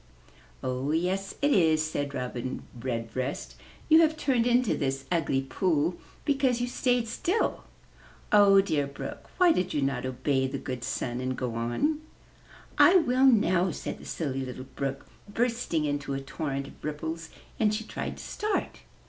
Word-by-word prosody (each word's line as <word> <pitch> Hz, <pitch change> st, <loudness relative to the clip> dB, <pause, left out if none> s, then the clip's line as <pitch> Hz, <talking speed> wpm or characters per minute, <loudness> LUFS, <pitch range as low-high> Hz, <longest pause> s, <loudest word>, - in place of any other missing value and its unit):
"Oh, 130 Hz, +2 st, -2 dB
yes 185 Hz, +4 st, -1 dB
it 290 Hz, -, +4 dB
is," 160 Hz, -, +4 dB
said 145 Hz, -2 st, -3 dB
Robin 125 Hz, 0 st, -4 dB, 0.2 s
Redbreast. 125 Hz, +2 st, -3 dB, 0.3 s
"You 320 Hz, +1 st, +7 dB
have 315 Hz, -1 st, +3 dB
turned 250 Hz, -6 st, +2 dB
into 245 Hz, -2 st, +3 dB
this 135 Hz, -2 st, -2 dB
ugly 140 Hz, -6 st, +1 dB
pool 160 Hz, +4 st, +1 dB, 0.3 s
because 270 Hz, -4 st, +2 dB
you 245 Hz, -, +1 dB
stayed 245 Hz, -1 st, +1 dB
still. 355 Hz, -, -1 dB, 0.7 s
Oh, 200 Hz, -2 st, +7 dB
dear 150 Hz, -7 st, 0 dB
Brook! 140 Hz, -, -8 dB
Why 360 Hz, -2 st, +6 dB
did 180 Hz, -, 0 dB
you 145 Hz, -, +1 dB
not 130 Hz, -2 st, -1 dB
obey 130 Hz, +1 st, 0 dB
the 135 Hz, +1 st, -4 dB
good 130 Hz, -2 st, -5 dB
Sun 120 Hz, -1 st, -2 dB
and 130 Hz, 0 st, -2 dB
go 125 Hz, -3 st, -2 dB
on?" 120 Hz, -, 0 dB, 0.8 s
"I 360 Hz, -, +8 dB
will 265 Hz, -6 st, +5 dB
now," 190 Hz, -7 st, +4 dB
said -, -, -5 dB
the -, -, -12 dB
Silly 135 Hz, -4 st, -3 dB
Little 130 Hz, 0 st, -7 dB
Brook, 135 Hz, -1 st, -3 dB, 0.3 s
bursting 230 Hz, -8 st, 0 dB
into 145 Hz, -1 st, -2 dB
a -, -, -2 dB
torrent 140 Hz, 0 st, -4 dB
of -, -, -14 dB
ripples; 160 Hz, +2 st, -4 dB, 0.3 s
and 215 Hz, -2 st, +3 dB
she 215 Hz, +1 st, -2 dB
tried -, -, -5 dB
to -, -, -9 dB
start. 425 Hz, 0 st, -2 dB
155 Hz, 160 wpm, -28 LUFS, -, 0.8 s, I